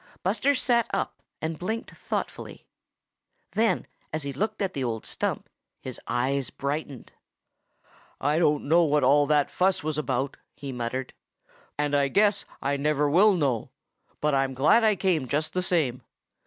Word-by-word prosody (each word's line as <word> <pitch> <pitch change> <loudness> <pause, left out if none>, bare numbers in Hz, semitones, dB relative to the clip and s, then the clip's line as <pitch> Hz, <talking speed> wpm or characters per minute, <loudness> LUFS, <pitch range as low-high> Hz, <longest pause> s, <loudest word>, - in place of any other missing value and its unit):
Buster 220 +10 +2
sat 240 -2 +2
up - - -3 0.2
and 160 -1 -3
blinked 220 +6 -3
thoughtfully. - - -5 0.9
Then 225 +1 +1 0.3
as 155 -1 -3
he 140 -1 -4
looked 210 +12 -2
at 195 -2 -1
the 135 - -2
old 115 -3 -3
stump, - - -2 0.3
his - - -6
eyes 130 +1 0
brightened. 140 -1 -4 1.1
"I 150 +3 +1
don't 150 -4 +2
know 165 +3 +5
what 150 -3 +2
all 145 +2 +5
that 150 -1 +2
fuss 185 -3 +1
was 155 -1 -1
about," 135 -1 -2 0.2
he 140 -1 -6
muttered, 125 +1 -4 0.6
"and 145 0 0
I 140 -1 +3
guess 205 +7 +2 0.2
I 140 +1 +1
never 150 +1 +1
will 195 +8 +5
know, 135 -9 0 0.5
but 150 -1 +2
I'm 135 -1 +1
glad 150 - +4
I 215 -2 +4
came 175 -8 0
just 155 +4 -1
the 185 - 0
same. 155 -9 0
150 Hz, 155 wpm, -26 LUFS, 135-180 Hz, 1.1 s, know